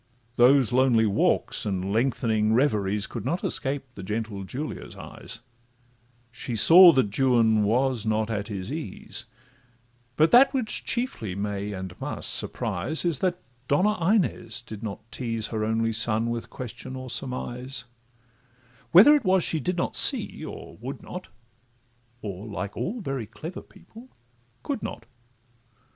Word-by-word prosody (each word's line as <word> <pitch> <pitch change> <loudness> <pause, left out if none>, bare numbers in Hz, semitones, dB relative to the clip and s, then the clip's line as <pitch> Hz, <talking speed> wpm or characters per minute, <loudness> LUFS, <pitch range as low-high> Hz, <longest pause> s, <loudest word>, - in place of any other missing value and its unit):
Those 125 -1 +5
lonely 125 -3 +4
walks, 100 -2 +1
and 95 -1 -2
lengthening 110 -2 +1
reveries, 105 -6 +1
Could 115 -2 -7
not 175 - -2
escape 135 +1 -1
the 100 - -9
gentle 105 0 -4
Julia's 140 +10 -6
eyes; 115 - -9 0.9
She 120 0 -5
saw 170 - +9
that 110 -7 +1
Juan 115 -5 +3
was 120 +2 +1
not 110 0 -1
at 105 -1 -3
his 100 -1 -5
ease; 150 - -6 0.9
But 155 +3 +3
that 260 +3 +6
which 245 -5 -2
chiefly 175 - -3
may, 100 0 -3
and 95 -2 -6
must - - -2
surprise, 155 +5 -1
Is, 165 -6 +1
that 180 -1 0
the - - -34 0.2
Donna 185 +5 +1
Inez 120 - -2
did 110 -3 -9
not 110 0 -7
tease 115 -3 -3
Her 110 -2 -2
only 115 +1 0
son 115 +1 +2
with 115 -1 -5
question 125 +1 -8
or 130 0 -7
surmise: 125 0 -4 1.1
Whether 210 - +9
it 295 -3 +2
was 185 -3 +3
she 160 - 0
did 180 +5 -2
not 170 - -2
see, - - +4
or - - -9
would 130 +5 -7
not, 180 +1 -8 1.0
Or, 100 0 -6
like 100 -1 -5
all 230 +5 -3
very 135 - -4
clever 165 - -8
people, 220 +6 -16 0.5
could 280 -5 -3
not. - - -7
120 Hz, 145 wpm, -25 LUFS, 110-155 Hz, 1.1 s, saw